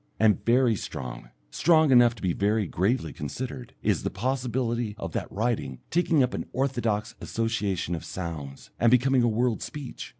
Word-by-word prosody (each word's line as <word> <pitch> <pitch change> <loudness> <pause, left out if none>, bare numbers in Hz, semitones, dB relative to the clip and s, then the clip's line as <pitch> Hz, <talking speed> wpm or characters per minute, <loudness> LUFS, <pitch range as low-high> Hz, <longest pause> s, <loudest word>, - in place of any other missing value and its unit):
And 110 -2 +3
very 120 -1 +4
strong - - -6 0.2
strong 160 -3 +4
enough 120 -2 +6
to 105 - -13
be 90 -2 +1
very 105 +3 +1
gravely 95 - 0
considered 125 - -6
is 105 -2 +2
the - - -1
possibility 120 0 -1
of - - -5
that - - -4
writing 110 - -1
taking 165 -4 +3
up 125 - -1
an - - -4
orthodox 115 -5 -1
association 105 -6 -1
of 80 - -4
sounds, 80 -6 -6
and 120 - +5
becoming 125 +2 +4
a 120 - +3
world 115 +1 +1
speech. 145 -4 -7
115 Hz, 165 wpm, -27 LUFS, 100-125 Hz, 0.2 s, enough